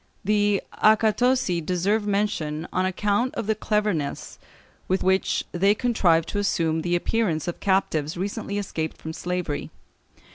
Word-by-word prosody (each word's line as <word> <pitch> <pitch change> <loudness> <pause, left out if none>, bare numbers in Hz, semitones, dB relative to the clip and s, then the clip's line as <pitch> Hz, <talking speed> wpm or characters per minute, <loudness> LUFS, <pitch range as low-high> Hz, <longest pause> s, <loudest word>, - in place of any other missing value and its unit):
The 205 0 +2 0.2
accatosi 220 -3 +3
deserve 195 +5 0
mention 170 -6 -1
on 185 0 +1
account 205 +6 0
of - - -3
the 220 - +2
cleverness 210 -8 -2 0.5
with 190 +1 0
which 190 +1 +1
they 195 +4 +3
contrived 180 -9 +2
to 205 - -2
assume 165 -5 0
the 175 +1 0
appearance 175 -4 0
of 175 - -4
captives 165 -5 0
recently 200 +2 -3
escaped 160 -6 -3
from 160 - -7
slavery. 180 -4 -3
190 Hz, 135 wpm, -24 LUFS, 170-210 Hz, 0.5 s, accatosi